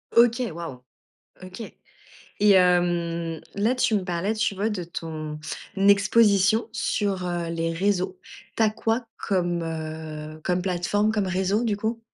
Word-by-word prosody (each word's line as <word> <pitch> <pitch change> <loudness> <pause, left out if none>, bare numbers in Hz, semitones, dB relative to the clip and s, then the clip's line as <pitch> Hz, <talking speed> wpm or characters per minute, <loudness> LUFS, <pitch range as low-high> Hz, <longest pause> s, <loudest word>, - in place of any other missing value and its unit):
OK 235 +1 +5
waouh! 150 -7 -7 0.6
OK 185 +4 -9 0.8
et 210 0 +5
hem, 175 -3 +2 0.2
là 220 +5 +2
tu 250 -2 +1
me 190 - -2
parlais, 180 +4 -1
tu 220 -1 0
vois, 205 +3 -1
de 190 -5 -3
ton 155 -2 -6 0.4
exposition 200 +2 +4
sur, 200 -5 -1
heu, 175 -1 -2
les 165 0 -1
réseaux. 185 +1 0 0.4
Tu - - +2
as 215 - +4
quoi 225 +2 -1
comme, 175 -3 -1
heu, 155 -1 -6
comme 180 -1 +1
plateforme, 195 +4 +1
comme 210 -3 0
réseau 190 +4 0
du 215 -3 0
coup? 220 +3 -2
185 Hz, 145 wpm, -25 LUFS, 170-210 Hz, 0.8 s, OK